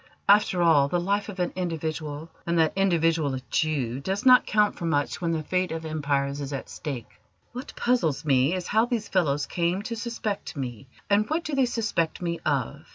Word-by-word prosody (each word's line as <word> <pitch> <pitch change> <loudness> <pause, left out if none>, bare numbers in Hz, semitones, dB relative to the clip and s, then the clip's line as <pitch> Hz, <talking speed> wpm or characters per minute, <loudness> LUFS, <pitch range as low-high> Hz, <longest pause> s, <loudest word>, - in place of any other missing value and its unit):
After 200 -3 +4
all, 150 -5 +5
the 175 +5 0
life 200 +4 -1
of 195 -2 -8
an 180 - -1
individual, 160 -3 -4 0.2
and 170 0 +1
that 160 -1 +3
individual 165 -6 +2
a 130 - -5
Jew, 135 -6 0
does 195 - -3
not 255 -1 +7
count 210 -1 +2
for 170 - -5
much 145 -1 0
when 170 - 0
the 160 -1 -1
fate 185 +3 -1
of 160 0 -4
empires 145 -2 -1
is 140 0 -5
at 135 - -5
stake. 135 -9 -7 0.3
What 250 +3 -8
puzzles 165 - +1
me 135 +3 +3
is 180 -2 -4
how 220 +5 +3
these 240 -4 -2
fellows 150 -6 +1
came 175 +3 -1
to 230 +2 -4
suspect 225 -5 -4
me, 130 -1 -5 0.2
and 205 +1 +2
what 320 +2 0
do 305 - -5
they 270 -2 +3
suspect 215 -9 -1
me 170 -1 -2
of. 65 - -2
170 Hz, 200 wpm, -26 LUFS, 145-200 Hz, 0.3 s, not